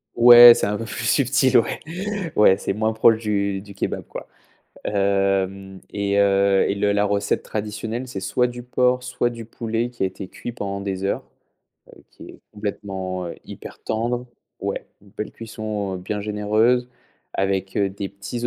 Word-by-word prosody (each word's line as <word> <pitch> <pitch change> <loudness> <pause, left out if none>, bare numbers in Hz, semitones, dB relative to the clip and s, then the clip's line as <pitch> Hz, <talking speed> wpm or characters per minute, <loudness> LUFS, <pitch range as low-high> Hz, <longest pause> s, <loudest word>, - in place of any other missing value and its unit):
Ouais 120 0 +10
c'est - - -1
un 105 0 -1
peu - - -5
plus 115 0 -5
subtil, 130 0 +3
ouais, 115 - +1 0.6
ouais, 95 -2 +6
c'est 100 - -2
moins 110 +1 0
proche 110 0 +4
du 100 -3 -1
du 100 0 -12
kebab - - -3
quoi. - - -8 0.6
Hem 100 -1 0
et 100 0 0
heu 100 -1 +3
et 100 - 0
le 100 0 +1
la 100 0 +2
recette 100 0 0
traditionnelle 110 +4 -4
c'est 100 -6 -5
soit 125 +6 +1
du 120 0 -5
porc 125 +1 +1
soit 125 -1 -1
du 115 -2 -8
poulet 115 +1 -3
qui 120 -5 -4
a - - +3
été 95 0 -6
cuit 120 - -7
pendant 100 -4 -5
des 95 -1 -4
heures, 100 - -1 0.7
heu, - - -16
qui - - -13
est - - -13
complètement, 95 -3 -4
heu, 85 - -6
hyper - - -11
tendre. 120 +3 -2 0.4
Ouais, - - -3 0.2
une 100 - -19
belle 105 - -6
cuisson 110 -3 -5
bien 100 +3 -4
généreuse 110 +4 +1 0.5
avec, 95 0 -1
heu, 100 -1 +1
des 100 0 -5
petits 110 +5 -5
105 Hz, 175 wpm, -22 LUFS, 100-115 Hz, 0.7 s, Ouais